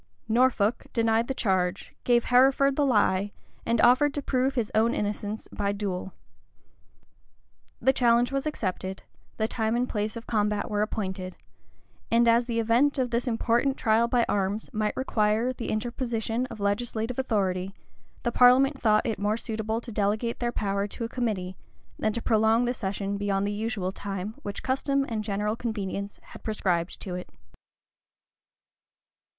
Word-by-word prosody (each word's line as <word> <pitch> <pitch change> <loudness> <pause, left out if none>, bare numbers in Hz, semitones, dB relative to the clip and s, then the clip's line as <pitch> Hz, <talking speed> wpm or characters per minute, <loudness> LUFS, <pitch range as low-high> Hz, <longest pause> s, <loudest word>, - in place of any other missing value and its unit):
[] - - -44
Norfolk.. 230 -2 +2
denied 230 0 +2
the 265 - -2
charge, 190 -4 -1
gave 240 -1 +4
Hereford 270 +2 +4
the 290 -1 +2
lie, 205 -4 +2 0.4
and 230 +1 +2
offered 255 +4 +5
to 290 - -3
prove 265 +1 0
his 235 -4 -1
own 225 +2 +3
innocence 210 +1 -3
by 200 -1 -1
duel. 195 -2 -4 1.7
The 265 - +3
challenge 240 -1 +3
was 275 +2 -1
accepted: 190 -8 -3 0.3
the 220 - +1
time 220 -1 -1
and 245 +1 +1
place 215 0 -2
of 230 - -7
combat 210 -1 0
were 205 0 +1
appointed: 190 -3 -3 0.7
and 235 +1 +4
as 235 +1 +4
the 230 -2 -1
event 240 +6 +3
of 255 -2 0
this 240 +2 0
important 240 +3 +1
trial 225 0 +3
by 240 0 +2
arms 200 +2 -1
might 215 0 -1
require 225 -1 +1
the 240 - -5
interposition 235 +1 -2
of 220 - -9
legislative 225 +4 -1
authority, 195 -6 -1 0.5
the 240 - 0
parliament 265 +3 +5
thought 215 -2 +3
it 225 -5 -2
more 210 +2 0
suitable 220 0 -3
to 240 - -8
delegate 215 +3 -1
their 240 -1 -1
power 200 -3 -1
to 220 - -6
a 230 - -3
committee, 205 -7 -2 0.4
than 215 - +1
to 235 - -3
prolong 220 +1 +3
the 245 - 0
session 200 -2 -3
beyond 200 -1 0
the 205 - -1
usual 210 -3 -2
time 195 +1 -5
which 200 -1 -6
custom 275 +1 0
and 220 -2 -3
general 210 +1 -1
convenience 205 -3 -4
had - - -13
prescribed 185 -5 -1
to 185 - -6
it. 180 0 -6
220 Hz, 160 wpm, -27 LUFS, 205-240 Hz, 1.7 s, offered